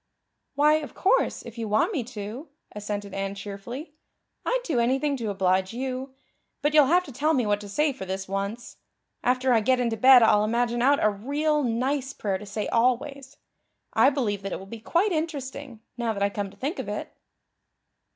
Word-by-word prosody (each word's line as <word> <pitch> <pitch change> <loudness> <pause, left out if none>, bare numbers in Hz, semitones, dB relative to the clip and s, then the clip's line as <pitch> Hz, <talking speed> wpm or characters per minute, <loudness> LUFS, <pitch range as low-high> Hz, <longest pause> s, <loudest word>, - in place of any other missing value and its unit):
"Why, 300 +2 +5
of 300 -2 -7
course, 385 - +1
if 235 0 -10
you 225 - -3
want 215 - +2
me 280 -8 -1
to," 230 +5 -7 0.2
assented 205 -1 -5
Anne 195 0 -3
cheerfully. 210 - -7 0.5
"I'd - - 0
do 305 - 0
anything 270 +4 +1
to 230 -4 -3
oblige 190 +1 +1
you. 260 +1 -4 0.5
But 295 +1 +2
you'll 300 -3 +6
have 355 +5 +4
to 285 - -10
tell 300 +5 +1
me 250 -4 +1
what 205 0 +1
to 205 - -9
say 295 +7 +1
for 260 - -8
this 190 0 -4
once. 200 +4 -4 0.5
After 255 +1 +2
I 230 - +5
get 255 +4 +2
into 235 -2 0
bed 255 +1 +8
I'll 210 -2 +5
imagine 235 +2 0
out 280 +3 +3
a 215 - +5
real 290 +8 0
nice 265 +3 -1
prayer 195 -6 -2
to 210 - -10
say 205 +1 -3
always. 265 +3 0 0.6
I 265 - +6
believe 230 -8 -1
that 195 0 -5
it - - -2
will 190 - -10
be 225 +3 -9
quite 350 - +1
interesting, 280 -6 -4 0.2
now 235 -2 -1
that 200 -1 -2
I 200 - +1
come 200 -1 -3
to - - -18
think 295 +8 -3
of - - -4
it." - - -5
245 Hz, 200 wpm, -26 LUFS, 205-280 Hz, 0.6 s, bed